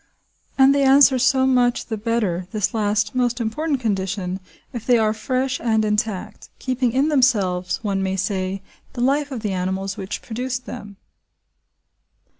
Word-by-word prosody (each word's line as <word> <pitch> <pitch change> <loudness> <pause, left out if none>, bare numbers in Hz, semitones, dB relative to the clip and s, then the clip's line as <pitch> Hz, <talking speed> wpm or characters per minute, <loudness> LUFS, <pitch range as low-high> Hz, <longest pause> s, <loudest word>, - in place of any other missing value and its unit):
And 270 0 +6
they 280 - +2
answer 270 -1 +6
so 260 +1 +3
much 250 -2 +2
the 225 - -4
better 210 -5 -1
this 210 +3 -1
last 210 +1 0
most 245 -1 0
important 270 +6 -1
condition 190 -4 -2 0.3
if 235 -3 -5
they 245 0 +4
are 215 -1 +2
fresh 255 +4 -2
and 220 -2 +1
intact, 210 -2 -3
keeping 255 -2 -1
in 270 +5 +2
themselves, 195 -10 +1
one 195 -2 -1
may 190 0 -1
say, 190 0 -2 0.3
the 245 - -4
life 280 +3 +1
of 255 -5 -5
the 210 -3 -2
animals 190 +2 -3
which 195 -1 -5
produced 250 +2 -4
them. 205 -5 -9
225 Hz, 155 wpm, -21 LUFS, 195-255 Hz, 0.3 s, And